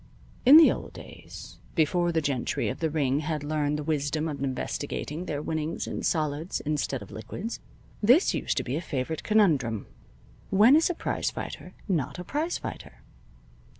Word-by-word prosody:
In 285 +4 +11
the 325 - +8
old - - -6
days, - - -11 0.2
before 175 +1 +2
the 160 -2 0
gentry 135 -4 -1
of 130 - -5
the 160 - 0
ring 145 -3 +1
had 155 -1 -3
learned 150 0 0
the 150 - -4
wisdom 150 +1 -1
of 140 -3 -4
investing 145 +4 -3
their 145 0 -3
winnings 160 +1 -2
in - - -4
solids 155 +1 -1
instead 145 -5 -2
of 100 - -14
liquids, 175 - -6 0.4
this 250 - +5
used - - -1
to - - +1
be 130 - -3
a 160 - -2
favorite 150 0 -3
conundrum: 150 - +2 0.6
When 215 +8 +6
is 320 +3 +4
a 355 - -1
prize - - -1
fighter - - -7
not 165 -9 -1
a 180 - -5
prize 305 - -2
fighter? - - -8
155 Hz, 170 wpm, -27 LUFS, 145-180 Hz, 0.6 s, In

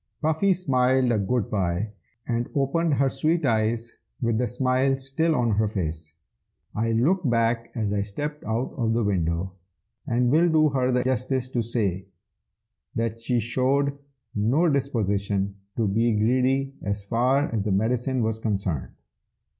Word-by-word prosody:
Puffy 160 +5 +2
smiled 130 -7 +2
a 110 - +2
good 105 +2 -1
bye, 95 +1 -1 0.4
and 120 0 -1
opened 145 +3 +1
her 135 +1 +2
sweet 155 +5 0
eyes 115 0 0 0.2
with 115 -2 0
the 125 - +1
smile 130 +3 +1
still 145 +5 +1
on 120 -2 +1
her 110 +1 +2
face. 80 -6 -4 0.6
I 115 +1 0
looked 150 +7 +2
back 115 0 +1
as 105 -4 -1
I 100 - +1
stepped 145 +9 -5
out 115 +3 -2
of 115 -3 +1
the 115 0 +1
window, 90 -2 0 0.6
and 120 0 +2
will 165 +4 +4
do 155 -1 +4
her 130 -2 +1
the 125 0 +2
justice 130 0 -1
to 120 -2 -1
say 100 -5 -2 0.9
that 115 0 -2
she 120 +1 0
showed 135 +5 +1 0.4
no 125 +12 +2
disposition 100 -8 -1 0.2
to 115 -3 +1
be 115 +4 +2
greedy 130 +5 +1
as 100 0 -3
far 125 +6 +1
as 110 - 0
the 105 - -1
medicine 120 +5 0
was 110 0 -1
concerned. 95 - -2
120 Hz, 155 wpm, -25 LUFS, 105-135 Hz, 0.9 s, will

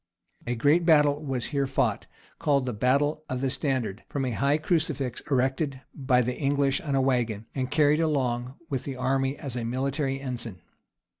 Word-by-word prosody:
A 120 - 0
great 145 +8 +3
battle 150 -3 +4
was 135 -4 -2
here 140 -1 +1
fought, 135 - 0 0.3
called 140 -3 +2
the 125 - -2
battle 140 +7 +1
of 130 - -2
the 135 0 0
Standard, 125 -9 -2
from 140 -2 -2
a 125 - -1
high 140 +7 +2
crucifix, 150 -6 -1
erected 135 +1 0
by 130 -3 +2
the 125 +1 -2
English 140 -1 +1
on 145 -4 -2
a - - +3
wagon, 120 -5 0
and 130 -2 -2
carried 150 +1 +3
along 130 -5 0
with 135 -5 -3
the 135 - -5
army 135 +2 0
as 135 -4 -6
a 120 - -2
military 135 +3 -1
ensign. 120 - -5
135 Hz, 175 wpm, -27 LUFS, 125-145 Hz, 0.3 s, battle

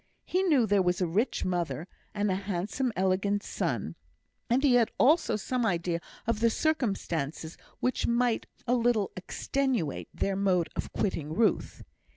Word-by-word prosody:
He 370 - +1
knew 300 -11 +4
there 205 -2 +3
was 180 -1 +1
a 185 - +2
rich 200 +9 0
mother, 175 -2 -2 0.3
and 205 -1 +1
a - - +1
handsome, 200 +6 -2
elegant 190 +2 +1
son; - - -2 0.6
and 250 +4 +2
he 275 -4 +5
had 240 -2 +4
also 310 0 +4
some 245 +4 -1
idea 175 -4 0 0.3
of 230 -2 0
the 230 +1 +4
circumstances 185 - -1 0.3
which 255 - 0
might 235 -1 +1 0.2
a 245 - +1
little 235 -4 +2
extenuate 235 - -2
their 195 - -1
mode 185 -4 +1
of - - -4
quitting 160 -6 -2
Ruth. 225 0 +1
205 Hz, 155 wpm, -29 LUFS, 180-245 Hz, 0.6 s, he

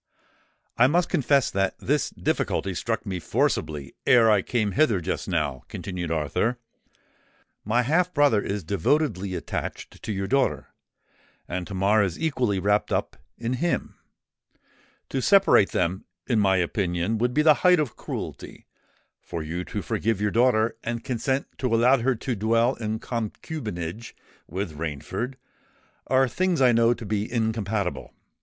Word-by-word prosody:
"I 125 - +7
must 170 +5 +2
confess 140 -1 +2
that 95 0 0
this - - 0
difficulty 95 - -1
struck 115 +6 -2
me 95 -3 -3
forcibly 75 -3 -1
ere 115 -3 +6
I 105 -2 +4
came 110 -1 -1
hither 120 -6 +3
just 90 +2 -3
now," 75 -8 -1
continued 90 -3 -5
Arthur. 80 - 0 1.1
"My 120 +4 +2
half 175 +7 +2
brother 145 -9 +3
is 100 -1 -3
devotedly 100 - 0
attached 80 -4 -5
to - - -4
your 100 -1 -2
daughter; 135 +6 0 0.8
and 90 0 -4
Tamar 100 +2 +2
is 95 -4 -1
equally 130 -10 0
wrapped 105 +2 +1
up - - -1 0.2
in 120 +1 -2
him. 175 0 -1 1.2
To 135 - -1
separate 195 - +5
them, 90 +2 -1 0.2
in 115 -4 +1
my 95 -2 +3
opinion, 90 +3 -1
would 125 +2 0
be 150 - +4
the 155 -1 +7
height 180 -2 +5
of 140 -7 -2
cruelty: - - -7 0.6
for 85 -2 -5
you 85 +4 -4
to 105 - -5
forgive 110 -1 -1
your 105 0 0
daughter 115 -1 +2
and 120 0 -3
consent 130 +2 -1
to 130 - 0
allow 125 +3 +4
her 130 +2 +1
to 120 +2 -3
dwell 115 +4 +2
in 110 -3 -3
concubinage 110 - -5 0.3
with 90 -2 -4
Rainford, 80 - -4 0.7
are 130 0 +3
things 180 +7 0
I 130 -2 +5
know 115 +1 +4
to 115 - -9
be 105 +1 -2
incompatible. 110 -4 -2
110 Hz, 150 wpm, -25 LUFS, 95-125 Hz, 1.2 s, I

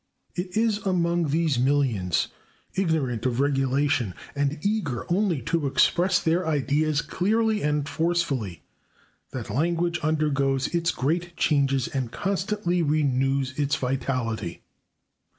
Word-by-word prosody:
It 180 +2 -3
is 220 -2 +2
among 175 -4 +1
these 155 -3 +1
millions, 125 - +1 0.4
ignorant 145 - 0
of 125 0 -1
regulation 135 -5 +1 0.2
and 145 +1 0
eager 200 - -1
only 180 - +1
to 165 +1 0
express 175 +7 +3
their 165 +2 +1
ideas 150 0 +1
clearly 220 +3 +1
and 150 0 0
forcefully, 145 - -1 0.7
that 120 -5 -6
language 170 +5 0
undergoes 140 -3 +1
its 170 0 +1
great 170 +5 -1
changes 135 -4 +2
and 130 -4 -3
constantly 195 - -1
renews 135 -3 +1
its 145 -1 +2
vitality. 125 -7 -2
150 Hz, 115 wpm, -25 LUFS, 135-175 Hz, 0.7 s, express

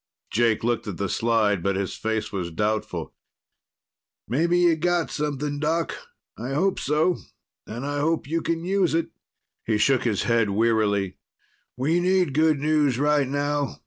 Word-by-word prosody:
Jake 115 +1 +2
looked 120 -1 -1
at 100 -5 -5
the 100 - -1
slide, 110 -3 +1
but 100 +2 0
his 95 -1 -2
face 110 0 -2
was 90 -4 -3
doubtful. 105 +5 -2 1.1
"Maybe 170 +7 +2
you've 170 -2 +3
got 175 0 +1
something, 145 -1 -2
Doc. 160 +2 0 0.4
I 125 +4 -4
hope 190 +5 +1
so. 155 +5 +1 0.5
And 120 +5 -5
I 145 0 -2
hope 160 +2 0
you 165 +4 -1
can 165 +1 -2
use 185 -3 +1
it." 165 0 -1 0.5
He 110 -2 0
shook 130 +4 +3
his 110 -5 0
head 115 -3 +2
wearily. 105 -2 +1 0.6
"We 155 +7 +1
need 180 -4 +2
good 155 0 +3
news 150 -3 +2
right 145 0 +2
now. 145 +1 -1
140 Hz, 155 wpm, -24 LUFS, 110-160 Hz, 1.1 s, you've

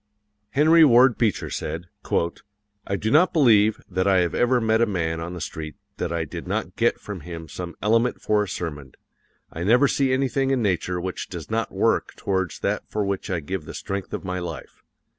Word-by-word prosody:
Henry 160 +7 +5
Ward 125 -3 +6
Beecher 110 -5 0
said: 85 +2 -4 1.0
"I 100 - 0
do 110 +3 -2
not 170 +7 +5
believe 110 - +4
that 95 +1 -1
I 95 -2 +4
have 85 - -1
ever 125 +1 +3
met 110 0 +2
a 115 - +4
man 80 -5 -1
on 85 +2 -5
the - - -6
street 80 0 -6 0.2
that 85 - -2
I 85 -1 -1
did - - -8
not - - -3
get - - +1
from 100 -3 -7
him 80 0 -8
some 85 0 -7
element 115 +3 +2
for 105 -1 +1
a 105 - -2
sermon. 75 -7 -6 0.6
I 80 - -4
never 125 +8 +5
see 135 -1 +1
anything 135 0 +1
in 135 -1 +2
nature 90 -2 0
which 90 +1 -5
does 85 +2 -8
not 115 +1 -1
work - - 0
towards 95 -3 -2
that - - -2
for 105 -1 -1
which 100 0 -3
I 90 -3 -1
give 80 +2 -5
the - - -8
strength 100 -1 -4
of - - -4
my 90 0 -2
life. 85 -4 -7
100 Hz, 200 wpm, -24 LUFS, 85-115 Hz, 1.0 s, Ward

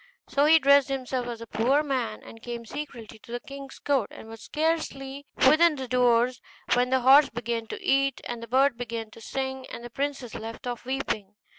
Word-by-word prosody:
So 285 +1 +2
he 320 +2 +7
dressed 280 -2 +5
himself 255 -2 -2
as 235 -1 -6
a - - -6
poor 255 +7 +2
man, 250 -7 -2
and 225 - -12
came 235 -1 -6
secretly 235 -5 -8
to 230 - -15
the 240 - -3
king's 275 +1 -10
court, 275 -7 0
and - - -11
was 225 0 -10
scarcely 285 -3 -2 0.2
within 315 +3 +6
the 265 -2 -5
doors 245 0 +3 0.3
when 245 0 +2
the 260 0 +2
horse 275 +3 +7
began 230 -1 -3
to - - -6
eat, 275 -1 +2
and 240 -1 -5
the 230 - -7
bird 260 +1 +3
to 230 -2 -6
sing, 265 +2 -4
and 235 - -8
the 240 - -8
princess 275 -2 -3
left 225 +2 -7
off 245 0 -5
weeping. 220 -6 -3
255 Hz, 195 wpm, -27 LUFS, 235-275 Hz, 0.3 s, he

